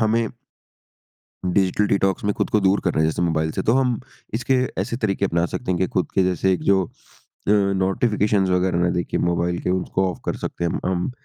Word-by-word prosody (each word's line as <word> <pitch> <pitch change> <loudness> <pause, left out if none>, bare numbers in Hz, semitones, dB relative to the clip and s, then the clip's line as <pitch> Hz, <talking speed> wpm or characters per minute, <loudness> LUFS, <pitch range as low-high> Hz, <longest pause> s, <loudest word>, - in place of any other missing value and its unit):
हमें 115 +1 +2 1.2
digital 95 +2 +2
detox 95 -1 +1
में 105 - +2
खुद - - -1
को 105 - +3
दूर 95 +1 +3
कर 90 - +1
रहे 80 - +2
हैं 80 - +3
जैसे 85 - -3
मोबाइल 80 -2 +1
से - - -2
तो 115 - +3
हम 125 -2 +2 0.3
इसके 125 +3 +1 0.3
ऐसे 115 - -3
तरीके 100 -4 0
अपना 85 -2 +1
सकते 95 +3 -3
हैं 90 - -1
कि 95 - +2
खुद 90 - -1
के 95 - +3
जैसे 95 +1 +2
जो 95 +1 +2
अ, - - -16 0.6
नोटिफिकेशंस 100 0 +2
वगैरह 90 -1 +1
ना 90 0 +2
दिखे 85 - -1
मोबाइल 85 0 0
के - - -2
उसको 95 +1 0
ऑफ - - -10
कर - - -1
सकते - - -5
हैं 85 - 0
हम। 95 - +1
उम, 90 +5 -1
95 Hz, 215 wpm, -22 LUFS, 90-105 Hz, 1.2 s, को